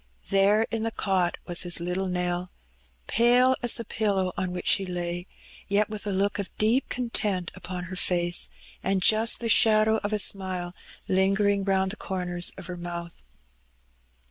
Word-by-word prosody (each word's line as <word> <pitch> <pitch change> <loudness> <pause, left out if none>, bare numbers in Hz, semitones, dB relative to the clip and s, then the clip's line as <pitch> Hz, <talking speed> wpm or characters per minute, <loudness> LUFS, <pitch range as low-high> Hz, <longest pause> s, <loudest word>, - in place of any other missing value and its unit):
There 200 +3 +4
in 225 - -2
the 225 - -1
cot 190 -5 0
was 175 - +3
his 175 -1 +2
little 180 +3 -2
Nell, 180 0 -2 0.5
pale 245 +3 +4
as 240 -2 +5
the 230 - -5
pillow 195 -4 -1
on 185 0 -2
which 180 - -5
she 195 - +3
lay, 175 -1 -4 0.4
yet 205 +2 +1
with 210 -1 -5
a - - -1
look 195 +1 0
of 200 - -3
deep 225 +5 +1
content 210 -7 -2
upon 180 0 -6
her 185 +2 -7
face, 175 -1 +1 0.3
and 190 -1 0
just 220 +4 +4
the 235 - -2
shadow 220 -1 +4
of 205 - -2
a 215 - +1
smile 185 -3 -1 0.3
lingering 195 +1 +2
round 190 -1 +1
the 215 - -6
comers 180 -3 -2
of - - -8
her 180 0 -6
mouth. 170 -1 -7
190 Hz, 170 wpm, -26 LUFS, 180-215 Hz, 0.5 s, as